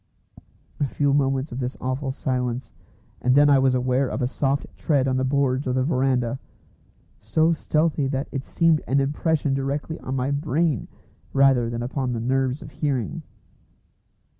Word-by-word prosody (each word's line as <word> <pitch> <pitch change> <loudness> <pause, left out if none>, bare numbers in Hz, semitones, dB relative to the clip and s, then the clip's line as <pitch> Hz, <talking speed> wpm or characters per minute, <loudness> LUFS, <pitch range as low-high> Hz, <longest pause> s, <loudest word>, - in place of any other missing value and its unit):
A 145 - +2
few 140 +1 +1
moments 135 0 +1
of 120 - -5
this 125 0 -3
awful 130 +2 -2
silence, 125 -3 -2 0.5
and 125 +1 +3
then 145 0 +6
I 140 - +6
was 130 -1 +3
aware 130 +1 +1
of 130 - -2
a - - +2
soft 135 +2 -1
tread 140 -4 +1
on 130 -1 +1
the 130 - 0
boards 135 0 +1
of 125 - 0
the 130 - +2
verandah, 130 -3 0 0.8
so 160 +1 +2
stealthy 155 -2 0
that 135 +1 -2
it 135 -2 -3
seemed 165 -2 +3
an 140 - +2
impression 145 +1 0
directly 140 +4 -2
on 130 - -4
my 130 +1 -1
brain 150 - 0 0.5
rather 135 -4 +4
than 120 0 -3
upon 125 0 -2
the 115 - -2
nerves 130 +3 0
of 145 - -11
hearing. 135 -9 -2
135 Hz, 165 wpm, -24 LUFS, 130-145 Hz, 0.8 s, then